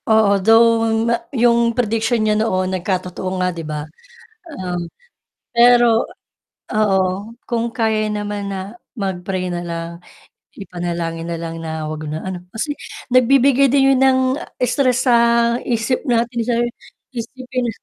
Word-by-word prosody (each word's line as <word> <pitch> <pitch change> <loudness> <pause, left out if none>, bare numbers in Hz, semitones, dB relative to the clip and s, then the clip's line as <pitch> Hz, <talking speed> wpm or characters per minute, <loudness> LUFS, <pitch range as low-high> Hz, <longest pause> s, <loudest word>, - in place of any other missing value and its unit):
Oo, 210 -3 +4
though 225 +2 +5 0.2
ma 235 - +2 0.2
'yong 235 0 +3
prediction 225 0 +1
niya 215 - +3
noon 185 -4 0
nagkatotoo 185 0 -3
nga 180 0 0
'di 170 - -6
ba, 150 -1 -5 0.6
um, 180 - -4 0.7
pero 240 -1 +5 0.7
oo, 210 -3 +3 0.4
kung 235 0 -1
kaya 220 -2 0
naman 205 -1 -3
na 195 +1 -5 0.2
mag-pray 185 -2 -3
na 175 - -3
lang 170 -1 -5 0.7
ipanalangin 170 -3 -4
na 170 - -3
lang 165 0 -6
na 160 -1 -4
huwag 155 0 -5
na 155 +3 -5
ano, 185 -2 -5
kasi 230 +9 -3 0.4
nagbibigay 270 +2 +5
din 270 +1 +4
'yon 260 - +1
ng 265 -1 +5 0.5
stress 255 -1 +1
sa 245 -2 +5 0.5
isip 235 +1 -1
natin 235 0 +1
sa 235 +1 0 0.6
isipin 250 +1 -4
215 Hz, 130 wpm, -19 LUFS, 180-240 Hz, 0.7 s, though